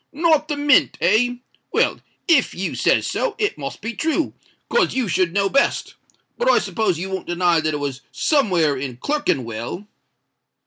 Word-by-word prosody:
"Not 310 Hz, 0 st, +2 dB
the 295 Hz, -2 st, -3 dB
Mint—eh? 245 Hz, -5 st, +3 dB, 0.4 s
Well, -, -, +1 dB, 0.3 s
if 320 Hz, -7 st, +3 dB
you 190 Hz, -, -3 dB
says -, -, +2 dB
so, 480 Hz, -4 st, -2 dB
it 415 Hz, -1 st, 0 dB
must -, -, -6 dB
be 230 Hz, +1 st, -4 dB
true—'cos 325 Hz, -, -2 dB
you 260 Hz, -4 st, 0 dB
should 185 Hz, -2 st, +1 dB
know 200 Hz, +2 st, +1 dB
best. 275 Hz, +7 st, +1 dB, 0.5 s
But -, -, +2 dB
I -, -, +5 dB
s'pose 215 Hz, -7 st, 0 dB
you 190 Hz, +3 st, -5 dB
won't 190 Hz, -2 st, -4 dB
deny 175 Hz, -1 st, +2 dB
that 155 Hz, -1 st, -1 dB
it -, -, -3 dB
was 140 Hz, -2 st, -4 dB
somewhere 180 Hz, -, +2 dB
in 130 Hz, -2 st, -5 dB
Clerkenwell?" 130 Hz, -, -2 dB
205 Hz, 155 wpm, -21 LUFS, -, 0.5 s, I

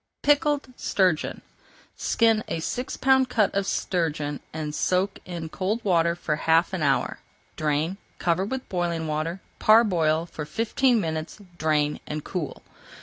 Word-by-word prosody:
PICKLED 290 Hz, -3 st, +2 dB
STURGEON 185 Hz, -5 st, +1 dB, 0.5 s
Skin 225 Hz, -2 st, +2 dB
a -, -, -2 dB
six 250 Hz, +10 st, -3 dB
pound 265 Hz, -1 st, +4 dB
cut 210 Hz, -4 st, +2 dB
of 200 Hz, 0 st, 0 dB
sturgeon 155 Hz, -7 st, -1 dB
and 155 Hz, -1 st, -4 dB
soak 185 Hz, +5 st, 0 dB
in 170 Hz, -3 st, -5 dB
cold 195 Hz, +7 st, -2 dB
water 170 Hz, -3 st, +3 dB
for 155 Hz, -3 st, -2 dB
half 165 Hz, +3 st, +3 dB
an 185 Hz, -, -2 dB
hour. 140 Hz, -2 st, +1 dB, 0.4 s
Drain, 155 Hz, +4 st, 0 dB, 0.2 s
cover 175 Hz, +2 st, +1 dB
with 260 Hz, +6 st, -4 dB
boiling 170 Hz, -3 st, -1 dB
water, 155 Hz, +4 st, -2 dB, 0.2 s
parboil 175 Hz, -8 st, +4 dB
for 160 Hz, -3 st, -7 dB
fifteen 230 Hz, -, +1 dB
minutes, 160 Hz, -3 st, -3 dB, 0.2 s
drain, 150 Hz, -1 st, +1 dB
and 150 Hz, 0 st, -4 dB
cool. 170 Hz, -6 st, -5 dB
175 Hz, 140 wpm, -25 LUFS, 155-210 Hz, 0.5 s, pound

